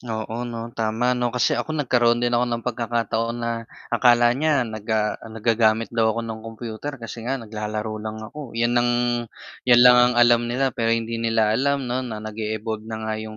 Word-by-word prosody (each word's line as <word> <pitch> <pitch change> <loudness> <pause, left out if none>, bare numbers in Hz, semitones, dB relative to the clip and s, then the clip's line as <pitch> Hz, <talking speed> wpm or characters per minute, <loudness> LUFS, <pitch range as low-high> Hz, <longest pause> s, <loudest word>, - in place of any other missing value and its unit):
Oo 115 +1 -4
'no, 115 0 -6
tama 115 +2 0
'no, 125 -1 0
kasi 125 +1 +1
ako 155 - -2
nagkaroon 120 -4 +2
din 120 - 0
ako 120 +1 +2
ng 115 -1 -3
pagkakataon 115 -1 -1
na 115 0 -2 0.4
akala 120 0 +5
niya 145 0 +1
naga 110 -1 -1 0.2
nag-gagamit 110 0 +1
daw 115 -1 +2
ako 115 - -2
ng 110 -1 -6
computer 115 +5 -7
kasi 115 -1 -8
nga 135 - 0
naglalaro 110 -2 -5
lang 110 0 -5
ako, 115 +3 -9
'yan 120 +1 +1
ang 120 0 +2 0.8
'yan 120 -1 +7
lang 125 0 +8
ang 125 0 +4
alam 120 0 +4
nila 130 +2 0
pero 115 -1 -1
hindi 115 0 -3
nila 115 -2 +2
alam 140 +3 +1
'no 125 +1 -1
nag-e-evolve 110 -1 -4
na 110 - -4
nga 110 - -2
'yong 110 0 -8
115 Hz, 185 wpm, -23 LUFS, 110-120 Hz, 0.8 s, lang